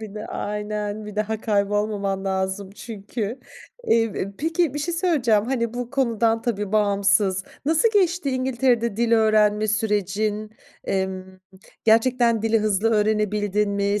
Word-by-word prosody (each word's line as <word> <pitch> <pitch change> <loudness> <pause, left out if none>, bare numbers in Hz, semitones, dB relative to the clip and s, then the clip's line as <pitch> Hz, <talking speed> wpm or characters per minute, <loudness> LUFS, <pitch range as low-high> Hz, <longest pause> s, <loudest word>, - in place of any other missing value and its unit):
Bir 215 -2 -8
de 210 - -6
aynen! 210 0 -4
Bir 210 0 -9
daha 215 +1 -1
kaybolmaman 200 -2 0
lazım 190 0 -2
çünkü. 215 +2 -6 0.5
Eee, 230 0 +4
e, 200 -2 -5
peki 325 -1 0
bir 295 - -2
şey 335 +4 -2
söyleyeceğim, 270 - +2
hani, 235 -3 -1
bu 245 -1 -4
konudan 230 -4 +1
tabii, 210 -4 -2
bağımsız. 200 -2 +2 0.2
Nasıl 320 +9 +3
geçti 355 -7 +2
İngiltere'de 250 -4 0
dil 235 0 +1
öğrenme 215 -1 +3
sürecin? 210 0 -1 0.3
Emm, 190 -1 -3 0.4
gerçekten 230 0 +3
dili 225 0 +2
hızlı 215 +1 +1
öğrenebildin 210 -1 +1
mi? 200 +1 0
215 Hz, 135 wpm, -23 LUFS, 205-235 Hz, 0.5 s, Eee